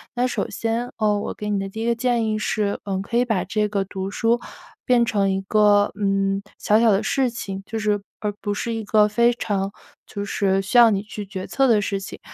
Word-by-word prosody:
那 250 +1 +1
首 - - -2
先， 230 +2 -2
哦， 210 -2 +1
我 - - -4
给 210 0 -5
你 205 - +1
的 195 0 -3
第 220 +3 -6
一 - - -2
个 235 0 +2
建 240 -1 +1
议 215 0 0
是， 210 -1 -1
嗯， 195 -2 -2
可 200 - -6
以 240 - +4
把 215 -7 -1
这 210 +2 0
个 200 -1 -1
读 190 0 -5
书 230 +3 +1 0.4
变 240 -2 +3
成 200 -3 +1
一 190 - 0
个， 205 +1 +3
嗯， 195 -1 0 0.2
小 215 +2 +3
小 230 - +5
的 195 0 +2
事 260 +3 +1
情， 195 -5 -6
就 225 - -4
是 210 -1 0 0.2
而 210 -1 -2
不 205 - -2
是 230 +3 -3
一 225 -1 -3
个 210 +1 +4
非 235 +3 +3
常 200 -4 -2 0.3
就 200 0 -5
是 195 -1 +1
需 200 +6 0
要 235 -1 +9
你 200 -2 0
去 210 0 -7
决 190 -1 -6
策 270 - +1
的 215 -3 +4
事 195 0 -2
情。 195 - -8
210 Hz, 255 characters per minute, -22 LUFS, 195-230 Hz, 0.4 s, 要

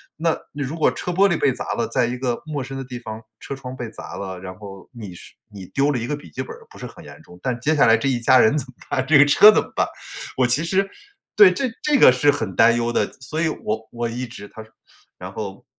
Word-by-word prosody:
那 165 +1 0
如 145 +2 -4
果 155 - +3
车 180 - -4
玻 195 +3 +4
璃 175 -4 0
被 135 - +2
砸 - - -4
了， 120 - -1
在 125 - +1
一 120 +1 -3
个 125 -2 -2
陌 150 -3 -4
生 135 +1 -7
的 135 - -6
地 125 -1 -7
方 110 -2 -8 0.2
车 - - -6
窗 130 -1 -8
被 120 -3 -6
砸 - - -9
了， 95 -2 -6
然 95 0 -8
后 100 -2 -11
你 105 -6 -9
是 85 - -12 0.2
你 100 -2 -9
丢 140 +8 0
了 130 - -1
一 120 - -4
个 150 - -1
笔 145 - -13
记 130 - -5
本 130 - -7
儿 - - -17
不 - - -15
是 - - -6
很 - - -14
严 - - -13
重， 90 - -16
但 125 -2 -2
接 155 +6 +1
下 145 - +5
来 115 -1 +5
这 115 - -2
一 125 -3 0
家 130 +2 +5
人 115 +7 +4
怎 145 - -2
么 - - -13 0.2
办？ 130 - -1
这 150 +2 +5
个 140 - +7
车 205 +9 +8
怎 - - +2
么 - - -11
办？ - - +2 0.5
我 130 -1 +3
其 125 +6 +1
实 195 +3 0 0.5
对， 205 -3 +8
这 265 - -1 0.2
这 300 -1 +3
个 130 - +7
是 145 +3 +3
很 110 -9 -4
担 115 +1 +5
忧 120 0 -1
的， - - 0
所 145 +5 -4
以 165 - +2
我 110 -6 -4
我 120 0 -3
一 120 +2 -4
直 105 -3 -10
他 110 - -11
说 110 - -22 0.5
然 - - -9
后， - - -7
130 Hz, 300 characters per minute, -22 LUFS, 115-145 Hz, 0.5 s, 车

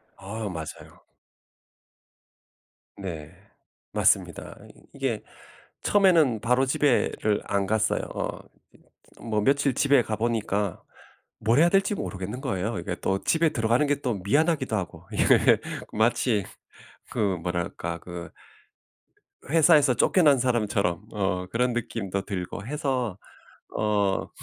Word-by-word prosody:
아 105 +2 -5
맞아요. 80 -4 -8 2.0
네. 80 -6 -6 0.6
맞습니다. - - +1
이 - - -15 0.2
이게 - - -2 0.6
처음에는 170 - +4
바로 125 +4 +2
집에를 130 -6 +1
안 100 -1 0
갔어요. 110 +1 +1
어 - - -3
이 - - -35 0.6
뭐 110 -2 -1
며칠 140 +2 +2
집에 140 -2 +4
가 110 -1 -3
보니까 105 -4 -1 0.6
뭘 115 +5 +2
해야 170 +2 +6
될지 195 +2 +2
모르겠는 105 - -5
거예요. 100 +3 -2
이게 95 -3 -4
또 95 0 0
집에 165 0 +3
들어가는 120 +1 +2
게 145 0 0
또 125 -5 -1
미안하기도 145 - +1
하고. 95 -5 -4
이게 - - +4 0.3
마치 110 -2 +2 0.7
그 - - -4 0.2
뭐랄까. 85 -1 -3
그 85 -1 -8 1.2
회사에서 150 -3 +5
쫓겨난 150 -1 +4
사람처럼 105 -7 0
어 95 -3 -1
그런 125 +5 0
느낌도 100 -5 -3
들고 95 0 -5
해서 130 - -2 0.6
어 100 -2 +1
110 Hz, 240 characters per minute, -26 LUFS, 100-135 Hz, 2.0 s, 해야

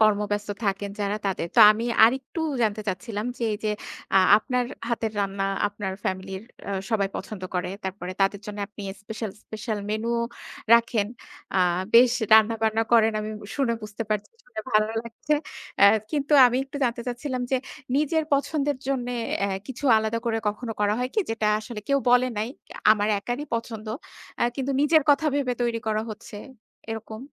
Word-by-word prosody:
কর্মব্যস্ত 210 -1 +2 0.2
থাকেন 200 0 -1
যারা 205 0 0
তাদের। 190 -3 -1
তো - - +8
আমি 220 +2 0 0.2
আরেকটু 265 +7 0 0.2
জানতে 215 -1 +1
চাচ্ছিলাম 205 +3 -3
যে - - -5
এই 210 - -1
যে 215 - +2 0.5
আ - - +9 0.2
আপনার 250 +2 -1 0.2
হাতের 225 -2 -1
রান্না 195 0 -1 0.2
আপনার 205 -2 -5
ফ্যামিলির 190 +1 -3 0.5
সবাই 200 -3 +1
পছন্দ 205 -4 -7
করে। 180 0 -1
তারপরে 185 -1 -4
তাদের 195 +1 +2
জন্য 210 0 -6
আপনি 210 0 -10 0.2
স্পেশাল, 220 0 -5
স্পেশাল 215 0 -4
মেনু 220 +2 -1 0.6
রাখেন। 230 -3 +2 0.5
আ - - +4 0.4
বেশ 240 0 +8 0.2
রান্না-বান্না 220 0 +4
করেন 225 -1 +5
আমি 215 - -4 0.2
শুনে 260 -5 +1
বুঝতে 210 +1 -5
পারছি। 210 -1 -1
শুনে 220 -3 -7
ভালো 215 0 +4
লাগছে। 235 +6 -2 0.5
এ - - +11 0.3
কিন্তু 290 0 -1
আমি 245 +1 0
একটু 270 +1 -9
জানতে 235 -1 -1
চাচ্ছিলাম 250 +1 -3
যে 265 - +3 0.4
নিজের 305 +2 +1
পছন্দের 285 0 +1
জন্য 260 -3 -1 0.4
এ - - -2 0.2
কিছু 265 +2 -7
আলাদা 220 +1 0
করে 225 -1 0
কখনো 225 +2 -4
করা 210 0 +2
হয় 250 +1 -1
কি 430 - +3
যেটা 225 -1 -1
আসলে 215 0 -7
কেউ 280 0 +4
বলে 250 +1 +5
নাই। 220 +3 -1 0.4
আমার 210 0 0
একারই 245 +7 -3
পছন্দ। 230 -1 -4 0.5
আ - - +3
কিন্তু 275 0 -1
নিজের 305 +2 +5
কথা 300 +2 +3
ভেবে 275 -3 0
তৈরি 235 -1 0
করা 215 0 0
হচ্ছে, 215 0 -9 0.5
এরকম? 220 +1 -6
220 Hz, 165 wpm, -25 LUFS, 210-250 Hz, 0.6 s, এ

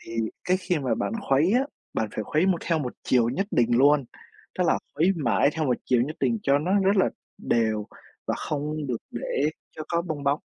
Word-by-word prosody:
Thì - - -11 0.3
cái 185 +1 +3
khi 180 -3 -1
mà 130 -3 0
bạn - - -2 0.2
khuấy 145 +8 +4
á, 245 - +4 0.3
bạn 110 - 0
phải 110 - -3
khuấy 155 - +1
một 185 -3 +2
theo 165 -2 0
một 125 -4 -3
chiều 120 -2 +3
nhất 195 +11 -1
định 120 0 +2
luôn, 145 +1 +5 0.5
tức - - +3
là - - +3 0.2
khuấy 165 +6 +3
mãi 120 - +2
theo 160 0 -1
một 125 -2 +2
chiều 125 -2 +3
nhất 150 +5 -4
định 230 - +1
cho 140 -3 +3
nó 170 +6 -1
rất 200 +2 +3
là 190 - +4 0.3
đều 110 -2 0 0.4
và - - 0
không 150 0 -3
được 125 -3 -1
để 140 +5 -1 0.3
cho 155 - -5
có 170 0 0
bong 155 -4 -4
bóng. 140 +2 +2
145 Hz, 220 wpm, -26 LUFS, 125-170 Hz, 0.5 s, luôn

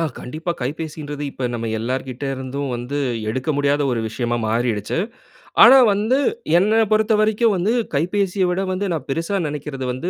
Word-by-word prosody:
ஆ - - +1 0.2
கண்டிப்பா 155 +7 -5
கைபேசின்றது 150 +1 -5
இப்ப 130 -2 -3
நம்ம 115 -1 -3
எல்லார்கிட்டருந்தும் 130 +2 -4
வந்து 125 +4 -4 0.3
எடுக்க 130 +7 -3
முடியாத 145 0 +1
ஒரு 115 - -1
விஷயமா 120 +1 -2
மாறிருச்சு. 115 +1 -1 0.7
ஆனா 270 - +9 0.2
வந்து, 220 +6 +1 0.4
என்ன 215 +5 +3
பொறுத்த 215 +1 +3
வரைக்கும் 215 +1 +3
வந்து 195 +6 +1 0.2
கைபேசிய 185 +4 +1
விட 180 +2 0
வந்து 190 +2 -2
நா - - 0
பெருசா 165 +7 -1
நெனைக்கிறது 145 -2 -5
வந்து 130 +9 -3
145 Hz, 150 wpm, -21 LUFS, 130-190 Hz, 0.7 s, ஆனா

